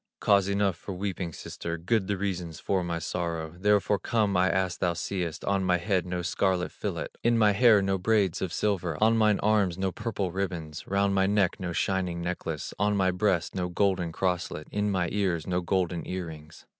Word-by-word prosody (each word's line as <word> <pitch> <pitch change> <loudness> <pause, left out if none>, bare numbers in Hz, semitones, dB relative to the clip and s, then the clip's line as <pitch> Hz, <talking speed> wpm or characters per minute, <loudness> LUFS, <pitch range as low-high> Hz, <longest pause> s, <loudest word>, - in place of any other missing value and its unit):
"Cause 100 -2 +4
enough 100 -3 +1
for 100 - -7
weeping, 95 -2 -3
sister, 85 +1 -6
Good 95 +4 0
the 100 -1 -1
reasons 90 -4 -3
for 95 -2 0
my 85 -1 -2
sorrow: 85 -1 -3
Therefore 105 +1 +2
come 105 0 +1
I 90 +1 +4
as 95 -2 0
thou 90 -1 +1
seest, 85 -1 -3
On 100 -1 +1
my 90 -1 +3
head 90 0 0
no 90 0 -3
scarlet 90 +1 0
fillet, - - -4
In 120 0 +3
my 105 -2 +5
hair 105 -1 +5
no 95 0 0
braids 100 -3 +1
of 95 - -2
silver, 95 -5 -1
On 110 +1 +4
mine 110 -2 +3
arms 100 -4 +2
no 95 0 -1
purple 100 -3 -3
ribbons, 85 -5 -4
Round 100 0 +1
my 95 0 +3
neck 100 -3 +1
no 90 -1 -3
shining 90 -1 -1
necklace, 85 -3 -4
On 105 0 +2
my 95 -1 +3
breast 90 -2 0
no 90 -1 -2
golden 90 -2 +1
crosslet, 90 -3 -2
In 105 0 0
mine 95 -4 0
ears 90 -6 0
no 90 0 0
golden 90 -1 -1
ear 90 -1 -3
rings." 80 -1 -11
95 Hz, 195 wpm, -28 LUFS, 85-100 Hz, -, my